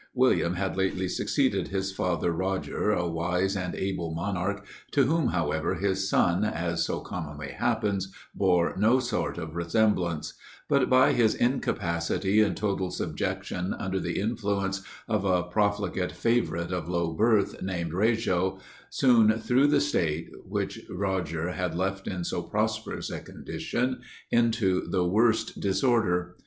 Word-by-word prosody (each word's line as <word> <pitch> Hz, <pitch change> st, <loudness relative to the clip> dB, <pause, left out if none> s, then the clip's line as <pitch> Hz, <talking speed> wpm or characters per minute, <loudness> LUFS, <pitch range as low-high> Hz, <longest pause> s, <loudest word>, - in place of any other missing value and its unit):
William 125 Hz, -9 st, +3 dB
had 95 Hz, +1 st, -2 dB
lately 95 Hz, -1 st, 0 dB
succeeded -, -, 0 dB
his 95 Hz, 0 st, -2 dB
father 90 Hz, -2 st, 0 dB
Roger, 95 Hz, +4 st, -1 dB
a 85 Hz, -5 st, +1 dB
wise 90 Hz, +4 st, 0 dB
and 90 Hz, -2 st, -3 dB
able 85 Hz, -4 st, -2 dB
monarch, 100 Hz, +3 st, -2 dB, 0.2 s
to 140 Hz, -, +3 dB
whom 155 Hz, +2 st, +2 dB
however 85 Hz, 0 st, 0 dB
his 95 Hz, +1 st, 0 dB
son, 90 Hz, +3 st, +3 dB
as 85 Hz, -5 st, -1 dB
so -, -, -2 dB
commonly 75 Hz, -1 st, -6 dB
happens, 100 Hz, -2 st, -1 dB, 0.2 s
bore 90 Hz, -3 st, +2 dB
no 115 Hz, +5 st, +4 dB
sort 125 Hz, -7 st, -2 dB
of 80 Hz, -1 st, -6 dB
resemblance; 85 Hz, -3 st, +1 dB, 0.3 s
but 140 Hz, -2 st, +2 dB
by 130 Hz, 0 st, +5 dB
his 115 Hz, -3 st, +3 dB
incapacity 95 Hz, -5 st, 0 dB
and 105 Hz, -, +1 dB
total 100 Hz, -3 st, -1 dB
subjection 90 Hz, 0 st, -3 dB
under 95 Hz, 0 st, -2 dB
the 85 Hz, -2 st, -2 dB
influence 100 Hz, -3 st, -1 dB, 0.3 s
of 105 Hz, -4 st, 0 dB
a 90 Hz, -2 st, +2 dB
profligate 100 Hz, -1 st, 0 dB
favourite 105 Hz, -8 st, 0 dB
of 90 Hz, -1 st, -3 dB
low 85 Hz, -2 st, 0 dB
birth, 105 Hz, +2 st, +2 dB
named 85 Hz, -3 st, -3 dB
Wrajo, 95 Hz, -3 st, +1 dB, 0.3 s
soon 115 Hz, -4 st, +5 dB
threw 125 Hz, +5 st, +3 dB
the 145 Hz, -1 st, +4 dB
state, 85 Hz, -, 0 dB
which -, -, -3 dB
Roger 90 Hz, -3 st, -2 dB
had 90 Hz, -2 st, -2 dB
left 95 Hz, +2 st, -2 dB
in 90 Hz, -2 st, -3 dB
so -, -, -2 dB
prosperous -, -, -2 dB
a -, -, -4 dB
condition, 125 Hz, +2 st, -3 dB, 0.3 s
into 115 Hz, -6 st, +2 dB
the 90 Hz, -2 st, +1 dB
worst 110 Hz, +5 st, +2 dB
disorder. 95 Hz, -5 st, +1 dB
95 Hz, 140 wpm, -27 LUFS, 90-110 Hz, 0.3 s, by